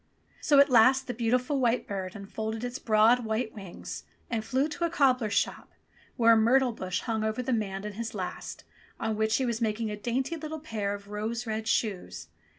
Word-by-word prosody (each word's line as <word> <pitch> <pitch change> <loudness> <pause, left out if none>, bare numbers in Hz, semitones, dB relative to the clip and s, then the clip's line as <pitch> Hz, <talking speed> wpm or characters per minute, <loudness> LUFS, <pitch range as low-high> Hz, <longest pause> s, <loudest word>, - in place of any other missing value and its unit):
So 290 - +4
at 280 -1 +6
last 255 +3 +6
the 245 - -4
beautiful 250 +4 0
white 245 -1 +1
bird 190 -1 -4
unfolded 220 +3 -5
its 245 +1 -4
broad 225 +3 +4
white 220 +1 -2
wings 195 -4 -8 0.3
and 225 -2 -1
flew 260 +6 +1
to 315 +3 -5
a - - 0
cobbler's 255 -8 +2
shop - - -1 0.4
where 230 -2 +6
a - - +6
myrtle 245 +3 +4
bush 185 -5 -3
hung 220 -2 -2
over 220 +3 -1
the 255 +1 -1
man 195 -3 -2
and 210 - -5
his 225 +1 -5
last, 185 -3 -5 0.4
on 220 -1 -1
which 220 +1 +1
he 265 - +1
was 235 -1 -2
mak 215 -1 0
ing 220 -2 -2
a - - -3
dainty 250 +8 -2
little 315 0 -6
pair 210 -9 -3
of 200 0 -12
rose 220 +3 -3
red 220 -1 -3
shoes. 90 - -2
225 Hz, 205 wpm, -28 LUFS, 215-250 Hz, 0.4 s, at